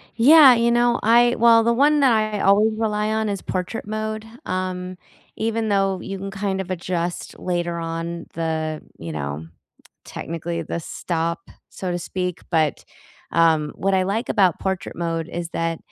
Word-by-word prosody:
Yeah, 275 +3 +8
you 235 0 +2
know, 240 0 +3
I 240 +2 +5
well, 230 0 +6
the 235 +1 +3
one 290 +5 +4
that 270 -3 +5
I 215 -2 +1
always 210 +3 +4
rely 215 -1 0
on 220 0 0
is 200 -2 -3
portrait 185 +4 -4
mode, 215 0 -4 0.2
um, 185 0 -3 0.4
even 225 0 -1
though 195 -2 +1
you 195 - -5
can, 195 +1 -6
kind 195 -1 -2
of 190 0 -7
adjust 175 -1 -3
later 175 -1 -2
on 165 +1 -4
the 160 -1 -2 0.2
you 80 0 -7
know, 75 +1 -5 0.6
technically 170 +1 -5
the 170 - -4
"stop", 170 +1 -3 0.2
so 185 - -5
to 175 - -1
speak, 180 0 -4
but, 160 -3 +1 0.5
um, 160 -3 +3
what 195 +1 0
I 185 - +3
like 215 +6 -2
about 190 -6 +3
portrait 190 -1 -3
mode 165 -1 -2
is 170 -1 -5
that, 165 -1 -2
185 Hz, 165 wpm, -22 LUFS, 170-220 Hz, 0.6 s, Yeah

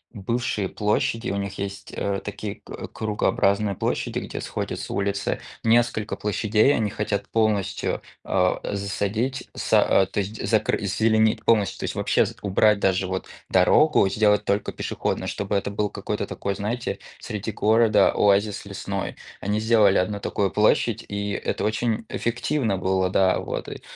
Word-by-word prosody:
бывшие 105 -1 -2
площади, 115 +3 0
у 100 - -2
них 100 -1 -4
есть, 100 0 -6
э, 100 -1 -2
такие 105 0 -5
к - - -8
кругообразные 105 -1 +1
площади, - - -2
где - - -6
сходятся - - -4
улицы. 100 0 -1 0.2
Несколько 115 -2 +2
площадей 105 +5 +2
они 110 -3 0
хотят 105 -1 -2
полностью, 110 -3 0 0.2
а, - - +1
засадить, 105 +6 -2
са - - +3
а, - - 0
то 95 - -3
есть, 100 +2 -3
закры 110 -1 +2
зазеленить 110 +2 +2
полностью, 105 -4 +2
то - - -5
есть - - -4
вообще - - +2 0.2
убрать 105 +1 +3
даже 95 -1 +1
вот 95 0 -3 0.2
дорогу, 95 +6 +4
сделать 105 0 +2
только 100 +1 0
пешеходную, - - -3
чтобы 100 0 -2
это 100 0 -1
был 105 0 -1
какой-то - - -4
такой, 100 - -3
знаете, 105 +5 -3 0.2
среди 105 +1 -4
города 110 -1 +4
оазис 100 0 +2
лесной. 100 -1 -4 0.3
Они 105 +2 0
сделали 110 -3 +4
1 100 +3 0
такую 100 -1 -1
площадь, 110 +1 +2
и 100 0 -2
это - - -2
очень 110 +1 0
эффективно 120 -2 -1
было, 95 0 +1
да. 95 0 +3
Вот - - -4
и - - -7
105 Hz, 150 wpm, -24 LUFS, 100-110 Hz, 0.3 s, дорогу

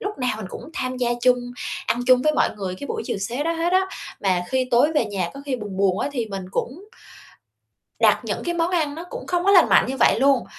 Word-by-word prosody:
lúc 410 -3 -5
nào 250 -1 0
mình 215 -3 -6
cũng - - -8
tham 255 0 -3
gia 245 -1 0
chung, 250 0 +5 0.5
ăn 240 - 0
chung 255 -1 +5
với 305 +2 +3
mọi - - +2
người 190 -2 -4
cái 285 - -8
buổi 450 +5 -3
chiều - - -2
xế 235 +8 -3
đó 330 - 0
hết 335 +1 -1
á. 375 0 +3 0.3
Mà 185 -3 +1
khi 260 -1 0
tối 260 +6 +4
về 295 - +2
nhà 195 -5 -3
có 275 - -8
khi 260 -2 -1
buồn 205 -4 -7
buồn 195 -1 +2
á - - -1
thì 240 -5 -2
mình 195 -3 -6
cũng 265 - -3 1.2
đặt - - +4
những - - -3
cái 345 - -1
món 335 0 0
ăn 315 -5 0
nó 330 +3 -7
cũng - - -7
không 355 0 0
có 395 - +4
lành 370 -4 +6
mạnh - - +5
như 265 - -3
vậy 245 - +3
luôn, 275 -2 +3
255 Hz, 260 wpm, -23 LUFS, 215-330 Hz, 1.2 s, lành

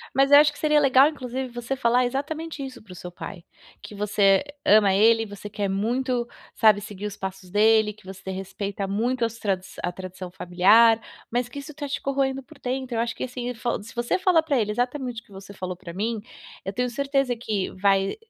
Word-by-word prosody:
Mas 275 +1 +4
eu 285 - +10
acho 295 0 +6
que 290 - -14
seria 300 -1 +3
legal, 275 -1 +6
inclusive, 260 -3 -4
você 240 +2 -4
falar 250 0 +2
exatamente 300 +4 -4
isso 260 -4 -9
para 205 - -15
o - - -9
seu 180 0 -8
pai, 175 0 -9 0.4
que 210 - -10
você 200 -1 +3 0.2
ama 205 -2 +5
ele 225 +3 +5
e - - -5
você 205 0 -9
quer 205 -1 -2
muito, 240 +5 -1 0.3
sabe, 215 -3 +5
seguir 205 0 -6
os 200 -1 -8
passos 190 -1 -6
dele, 215 +2 +4
que 215 -1 -22
você 190 0 -9
respeita 195 +1 -4
muito 235 +5 0
as 230 0 -5
tradi 190 -3 -1 0.2
a 175 - -1
tradição 185 0 -8
familiar, 205 +6 +4 0.3
mas 240 0 -1
que 245 - -10
isso 280 +2 -9
tá 290 0 -5
te 280 - -3
corroendo 270 -1 -1
por 310 +2 -17
dentro, 255 -1 -3
eu - - 0
acho 235 0 -2
que - - -5
assim, 250 -1 -4
fa 235 -1 -2
se 220 +4 -12
você 240 +9 0
fala 360 -4 +4
pra 285 -5 +1
ele, 210 -2 0
exatamente 245 +1 -2
o - - -33
que - - -25
você 195 +1 -11
falou 185 -2 -5
pra 175 -1 -10
mim, 215 +4 -2 0.4
eu 195 - -3
tenho 250 +5 -1
certeza 275 0 0
que 215 -5 -2
vai 195 0 +1
230 Hz, 220 wpm, -25 LUFS, 195-260 Hz, 0.4 s, eu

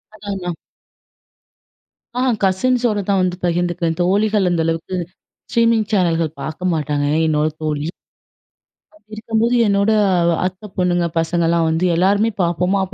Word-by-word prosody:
அதான், 205 -1 -6
அதான். 180 -2 -4 1.6
ஆ. - - +1 0.2
கசின்ஸ்ஸோட 235 +3 +1
தான் 195 - +3
வந்து 180 -1 -1
பகிர்ந்துக்குவேன். 175 -1 -1
தோழிகள் 205 +2 +2
அந்த 175 -2 +1
அளவுக்கு 165 +3 -2 0.5
ஸ்ட்ரீமிங் 230 -2 +2
சேனல்கள் 170 -5 +1
பாக்க 155 +3 -6
மாட்டாங்க. 150 -2 -1 0.2
என்னோட 155 -1 +1 0.2
தோழி. 150 -1 -2 1.3
இருக்கும்போது 225 +2 0
என்னோட 200 +1 +2 0.5
அத்த 185 +3 -4
பொண்ணுங்க 175 -1 +1
பசங்கலாம் 165 0 +1
வந்து 160 +3 0
எல்லாருமே 200 +5 +3
பாப்போமா 180 +3 +1
அப்போ 190 +1 -7
180 Hz, 115 wpm, -19 LUFS, 165-205 Hz, 1.6 s, தான்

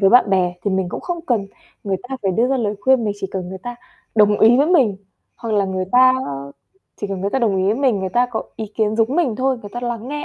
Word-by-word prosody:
với 195 -1 +5
bạn 240 -4 +5
bè 180 -2 +2
thì 200 - +1
mình 190 -1 0
cũng - - -5
không 345 -2 -4
cần 220 -6 0 0.4
người 195 -2 0
ta 265 - -4
phải 190 -1 +1
đưa 235 +6 +2
ra 270 - +1
lời 210 -4 -1
khuyên, 260 -1 +3
mình 205 - 0
chỉ 195 - -2
cần 185 -2 -4
người 190 0 -7
ta 245 0 -6 0.4
đồng 210 -1 +4
ý 230 +3 +7
với 285 - +3
mình, 270 - +3 0.4
hoặc 225 -2 -3
là 200 -1 +2
người 185 -1 -2
ta 255 +1 +6 0.9
chỉ 205 - -2
cần 195 -2 -4
người 200 +1 -1
ta 270 - 0
đồng 215 -6 +1
ý 185 - +1
với 205 +3 +2
mình, 255 -6 +1
người 190 - -2
ta 245 +6 +2
có 225 - -2
ý 220 - -4
kiến 215 -1 +1
giống 230 +5 +1
mình 270 -11 +1
thôi, 260 -1 0
người 205 - -9
ta 240 - -5
lắng 240 0 -4
nghe, 295 0 -4
220 Hz, 280 wpm, -20 LUFS, 195-250 Hz, 0.9 s, ý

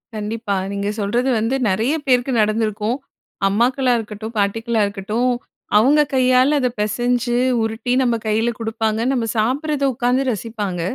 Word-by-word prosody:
கண்டிப்பா. 215 0 -3 0.2
நீங்க 200 0 -2
சொல்றது 240 +6 0
வந்து 225 +4 0
நிறைய 225 +10 +1
பேருக்கு 255 -1 +2
நடந்திருக்கும். 215 +2 0 0.5
அம்மாக்களாருக்கட்டும், 230 -1 0
பாட்டிக்களாருக்கட்டும். 215 +2 0 0.5
அவங்க 280 +7 +5
கையால, 255 +2 +4
அதை 250 - +2
பிசஞ்சு 240 +3 0 0.3
உருட்டி 225 +3 -3
நம்ம 240 -2 +2
கையில் 225 +2 0
குடுப்பாங்க. 225 0 -1
நம்ம 245 -4 0
சாப்பிடுறத 280 +6 0
உட்காந்து 250 +2 +1
ரசிப்பாங்க. 205 -5 -4
230 Hz, 115 wpm, -20 LUFS, 215-250 Hz, 0.5 s, அவங்க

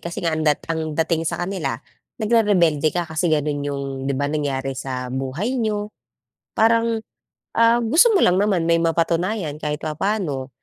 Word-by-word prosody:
Kasi 170 0 -6
nga 165 - +1
ang 160 - -1
dat 150 - 0
ang 160 -2 -3
dating 165 0 0
sa - - -3
kanila 175 -10 -3 0.4
nagre-rebelde 205 - +3
ka. 175 -1 0
Kasi, 160 +2 -1
ganon 150 -2 0
yung 140 -1 -3 0.3
'di 140 - -1
ba, 145 - -1
nangyari 135 -3 -2
sa 125 -1 -5
buhay 160 - -2
niyo. 210 -1 -2 0.6
Parang, 230 0 +2 0.5
ah, 230 +1 +4
gusto 255 - +4
mo - - +4
lang 180 +2 +3
naman 195 -5 +1
may 165 0 +3
mapatunayan 170 +1 0
kahit 150 0 -2
papaano. 155 -5 -2
165 Hz, 165 wpm, -21 LUFS, 145-210 Hz, 0.6 s, ah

